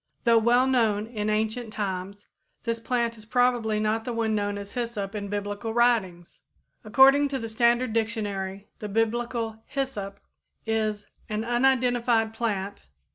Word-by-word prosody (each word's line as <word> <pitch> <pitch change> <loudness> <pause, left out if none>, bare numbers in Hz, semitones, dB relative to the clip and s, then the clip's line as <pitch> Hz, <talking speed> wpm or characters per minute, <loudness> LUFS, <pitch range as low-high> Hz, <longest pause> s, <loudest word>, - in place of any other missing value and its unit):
Though 230 -1 +5
well 240 +3 +4
known 225 -5 +2
in 215 -2 -3
ancient 220 +2 -1
times, 200 -1 -4 0.4
this 230 -1 -2
plant 235 0 -1
is 215 - -13
probably 245 -3 +2
not 215 +1 0
the 245 - -4
one 225 -1 0
known 205 -1 -1
as 200 0 -7
hyssop 230 -5 -3
in 205 -1 -4
Biblical 205 +2 -4
writings. 210 -8 +1 0.4
According 270 +6 +6
to 275 -1 -3
the 230 - -5
Standard 235 +1 +2
Dictionary 205 -4 -2
the 210 - -5
Biblical 225 +1 -1
"hyssop" 225 -8 -4 0.5
is 215 -2 -1 0.2
"an 215 +1 -2
unidentified 240 -2 +2
plant 200 - -3
225 Hz, 140 wpm, -26 LUFS, 205-240 Hz, 0.5 s, According